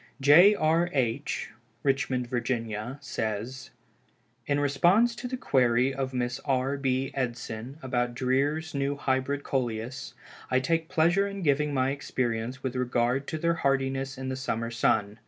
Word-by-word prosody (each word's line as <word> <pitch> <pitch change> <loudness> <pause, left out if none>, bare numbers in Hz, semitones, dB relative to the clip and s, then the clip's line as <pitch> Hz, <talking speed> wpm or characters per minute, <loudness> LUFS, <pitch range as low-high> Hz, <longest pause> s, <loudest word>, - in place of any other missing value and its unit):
J. 165 +10 +7
R. 165 0 +2
H., 135 +1 -1 0.3
Richmond, 135 -2 +1
Va., 120 -1 -3
says: 115 0 -4 0.8
"In 145 0 +1
response 175 - +3
to 245 - -5
the 255 +1 -4
query 125 - +2
of 135 -1 -3
Mrs. 125 0 -2
R. 135 +1 0
B. 135 -1 -1
Edson 120 0 -4
about 120 -2 -1
Dreer's 140 +5 0
New 140 0 -1
Hybrid 140 0 -1
Coleus, 125 0 -3 0.3
I 130 - +3
take 165 +4 0
pleasure 185 +3 +3
in 200 -1 -6
giving 150 0 +2
my 130 -1 +1
experience 125 -3 -3
with 130 -1 -3
regard 125 +1 0
to 155 - -3
their 170 +2 +1
hardiness 135 -3 -1
in 130 0 -4
the 130 - -2
summer 115 -3 -3
sun. 110 -2 +1
135 Hz, 145 wpm, -28 LUFS, 125-145 Hz, 0.8 s, J